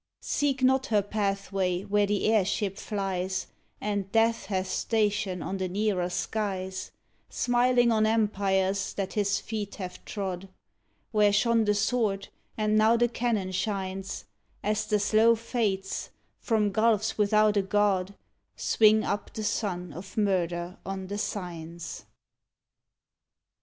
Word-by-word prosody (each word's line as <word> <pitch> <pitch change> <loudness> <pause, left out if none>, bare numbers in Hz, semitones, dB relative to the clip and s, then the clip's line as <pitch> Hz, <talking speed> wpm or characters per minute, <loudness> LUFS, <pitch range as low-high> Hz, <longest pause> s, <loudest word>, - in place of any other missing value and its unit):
Seek 275 -2 0
not 265 +1 +3
her 210 -3 +2
pathway 195 -3 -1
where 205 0 +2
the 205 0 0
airship 205 -2 +1
flies 190 -2 -2 0.3
And 200 -2 -2
Death 225 -1 +2
hath 190 -2 -1
station 205 -4 0
on 195 - -3
the 190 -1 -1
nearer 190 -2 0
skies, 190 0 -3 0.4
Smiling 245 0 +3
on 215 -1 +3
empires 195 -3 +1
that 195 -1 -3
his 200 -2 +1
feet 210 -3 -5
have 185 -2 -7
trod, 190 -2 -4 0.6
Where 210 -2 +4
shone 230 +2 +3
the 210 0 +2
sword 205 -2 0 0.3
and 215 -1 +1
now 220 +2 +5
the 240 +1 +3
cannon 225 -5 -1
shines, 190 0 -3 0.4
As 210 +1 0
the 210 - +2
slow 215 +3 +4
Fates, 215 -4 -2 0.3
from 215 -3 +1
gulfs 215 0 +2
without 215 0 +4
a 200 - +4
God, 195 -1 +1 0.4
Swing 215 0 +4
up 205 - -2
the 220 - -5
sun 185 -6 -2
of 185 +7 -10
murder 180 -3 0
on 195 0 -5
the 205 +2 -4
Signs. 170 -4 -5
205 Hz, 130 wpm, -28 LUFS, 190-220 Hz, 0.6 s, now